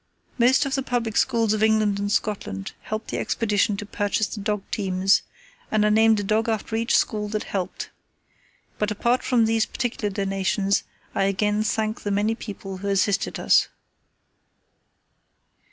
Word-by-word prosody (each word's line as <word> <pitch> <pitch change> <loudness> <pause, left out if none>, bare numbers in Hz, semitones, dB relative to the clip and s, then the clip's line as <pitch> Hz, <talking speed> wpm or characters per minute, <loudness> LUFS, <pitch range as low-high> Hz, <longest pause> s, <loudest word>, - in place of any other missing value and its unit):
Most 260 +4 +4
of 275 - -3
the 270 - +1
Public 240 -4 -2
Schools 230 -4 +2
of 215 - -1
England 215 -2 +3
and 205 0 -2
Scotland 95 - -2
helped 215 +1 -5
the - - -2
Expedition 210 -2 0
to 205 - -5
purchase 205 +1 0
the 210 - -6
dog 210 0 -1
teams, 190 -2 +2 0.5
and 215 -1 +2
I - - +4
named 220 0 +4
a - - -2
dog 215 +3 +1
after 220 0 -2
each 230 +1 +2
school 210 -2 0
that 215 0 -2
helped. 190 -3 -4 0.9
But 210 - +1
apart 235 +4 +1
from 245 -3 +2
these 225 0 +1
particular 230 -4 -2
donations 195 0 0 0.3
I 195 - +1
again 210 +2 +1
thank 215 +1 -1
the 205 - -3
many 205 +2 +1
people 195 -4 -7
who 200 +2 -6
assisted 200 0 +1
us. - - +4
210 Hz, 160 wpm, -24 LUFS, 200-225 Hz, 0.9 s, Most